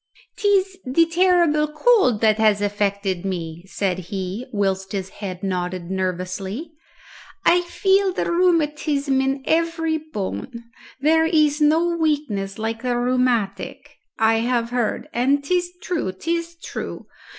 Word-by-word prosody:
"'Tis 395 -3 +1
the 280 +6 +3
terrible 335 -3 +3
cold 300 - +3
that 215 -1 +3
has 215 -2 +4
affected 200 -2 -1
me," 170 -3 -4
said 190 -2 -1
he, 195 +5 -4
whilst 195 -2 -1
his 195 -1 -3
head 185 -2 -5
nodded 180 -1 -3
nervously. 190 - -3 0.7
"I 355 +1 +5
feel 385 +2 +2
the - - -2
rheumatism 300 -5 +1
in 270 0 -1
every 325 -1 +1
bone. 280 -8 -5 0.5
There 320 +2 +4
is 305 -2 +2
no 315 +3 +4
weakness 290 -12 -1
like 225 +1 -3
the 245 -1 0
rheumatic, 245 -5 -1 0.2
I 225 0 +3
have 235 0 0
heard, 245 +1 -1
and 275 +3 +2
'tis 355 +3 0
true, 325 - -1
'tis 335 - -3
true. 335 - -7
255 Hz, 130 wpm, -22 LUFS, 200-325 Hz, 0.7 s, I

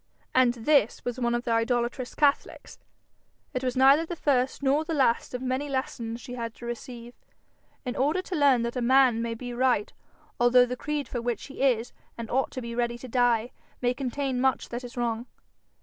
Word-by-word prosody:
And 250 -2 +4
this 240 0 +2
was 245 +1 -3
one 240 -1 +1
of 240 - -2
the 235 - -2
idolatrous 240 +2 0
catholics! 285 -2 0 0.7
It 255 - -2
was 255 0 -1
neither 275 +4 +6
the 340 +1 -5
first 270 -3 0
nor 280 +3 +3
the 320 0 -3
last 255 -3 +1
of 250 - -5
many 260 +3 -2
lessons 240 -4 -3
she 245 0 -9
had 230 -2 -5
to 240 - -10
receive, 240 0 -7 0.7
in 250 - -3
order 305 +8 +1
to 370 - -5
learn 275 -6 +4
that 235 +1 -3
a 250 - -1
man 255 -1 +4
may 230 0 -2
be 245 +1 -7
right 245 -4 +1 0.5
although 245 +1 +6
the 250 0 -4
creed 295 +2 -3
for 240 - -4
which 240 -2 -3
he 280 - -9
is 245 -3 +1 0.2
and 230 -1 -6
ought 265 +1 +1
to 255 - -6
be 235 0 -5
ready 235 0 -1
to 255 - -9
die, 245 -1 +2 0.3
may 245 0 +1
contain 260 0 -2
much 265 -1 +1
that 240 +1 -5
is 245 0 -10
wrong. 235 0 -2
250 Hz, 200 wpm, -27 LUFS, 235-265 Hz, 0.7 s, neither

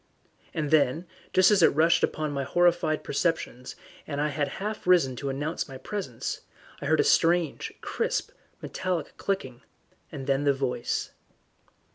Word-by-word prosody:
And 155 -3 -2
then, 155 +2 +3 0.3
just 185 +2 +5
as 205 -3 +5
it 160 - +5
rushed 165 +2 +4
upon 155 -1 0
my 140 -1 -2
horrified 175 +1 +2
perceptions, 140 -5 -2 0.3
and 145 -2 -3
I 150 +1 +1
had 145 0 -1
half 210 -1 -4
risen 165 -8 +4
to 140 - -3
announce 145 +5 -2
my 135 - -7
presence, 130 - -4 0.4
I 140 - -3
heard 155 +1 +3
a - - +2
strange, 170 -2 +2
crisp, - - -2 0.3
metallic 180 -4 -3
clicking, 130 -11 -3 0.5
and 140 -4 -6
then 135 +1 +1
the 140 -1 +4
voice. 130 -3 -2
155 Hz, 150 wpm, -27 LUFS, 135-175 Hz, 0.5 s, just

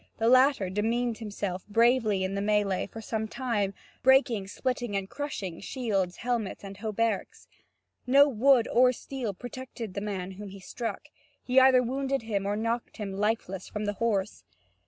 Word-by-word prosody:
The 225 - +1
latter 255 -7 +4
demeaned 230 +3 0
himself 200 -4 -4
bravely 225 -2 +3
in 190 +1 -2
the 200 - -1
melee 205 -2 +1
for 225 - -9
some 220 0 -3
time, 215 -6 -1 0.3
breaking, 255 -7 +4
splitting, 245 0 -2
and 195 -1 -1
crushing 200 - -5
shields, 195 -7 -1
helmets 230 -5 -2
and 195 0 -8
hauberks. 220 0 -2 0.6
No 280 +3 +7
wood 260 -1 +4
or 250 +1 +5
steel 245 -5 -5
protected 245 -2 -7
the 200 - -3
man 195 -3 -4
whom 200 +1 -8
he 195 +1 -10
struck; 225 +2 -5 0.4
he 255 +1 +4
either 260 -1 +6
wounded 270 +1 -1
him 200 -3 -2
or 205 - 0
knocked 230 +2 -2
him 200 -3 -4
lifeless 200 -2 -1
from 210 0 -4
the 205 - -1
horse. 210 - 0
220 Hz, 160 wpm, -28 LUFS, 200-245 Hz, 0.6 s, No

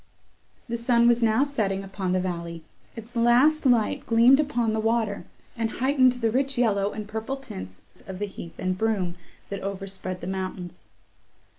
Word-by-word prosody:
The 235 0 -2
sun 235 0 +3
was 240 0 +4
now 225 +3 +3
setting 210 -9 -1
upon 195 -1 -3
the 185 - +2
valley; 170 -2 -4 0.3
its 230 +2 -10
last 255 +6 +4
light 235 -4 +2
gleamed 235 +4 +6
upon 240 -7 0
the 220 - 0
water, 225 -2 0 0.3
and 225 -2 -1
heightened 260 -1 +3
the 230 -3 -1
rich 270 +2 0
yellow 205 -4 +2
and 210 -1 -6
purple 220 +5 -4
tints 95 - -9 0.2
of 190 -1 -6
the 205 - -2
heath 170 -4 -10
and 185 0 -1
broom, 195 -4 0 0.4
that 200 - -4
overspread 195 -1 -5
the - - -6
mountains. 185 -1 -5
220 Hz, 165 wpm, -25 LUFS, 190-240 Hz, 0.4 s, gleamed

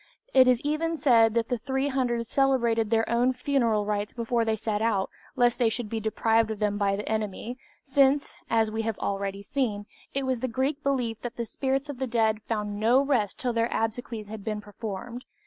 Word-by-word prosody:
It 260 -1 +7
is 250 -2 +4
even 320 +3 -1
said 230 -6 +4
that 230 -1 +1
the 245 - -1
300 265 -2 -1
celebrated 235 -4 +2
their 225 0 +2
own 240 +2 +2
funeral 245 -5 +1
rites 205 0 -2
before 235 0 0
they 220 -1 +1
set 215 -1 -2
out 205 -4 +1 0.2
lest 240 0 +3
they 235 -2 +4
should 225 -1 -4
be 225 - -2
deprived 225 +1 +2
of 220 - -3
them 205 0 0
by 200 -1 +2
the 210 - -5
enemy, 220 +3 -3 0.2
since, 275 +1 +2
as 225 -1 +2
we 220 +1 -1
have 225 -1 -2
already 200 0 -3
seen, 210 -4 -2 0.3
it 275 -1 0
was 260 -2 0
the 260 - -1
Greek 265 +5 -1
belief 250 -6 -1
that 240 -1 -5
the 235 - -3
spirits 270 +4 -1
of 285 -4 -7
the 265 - -1
dead 220 -2 +1
found 210 -2 -2
no 235 +4 +4
rest 265 -8 +1
till 250 -5 -1
their 230 +1 +1
obsequies 225 -1 -2
had 215 -1 -8
been 215 -1 -2
performed. 210 +3 -7
230 Hz, 200 wpm, -27 LUFS, 215-260 Hz, 0.3 s, It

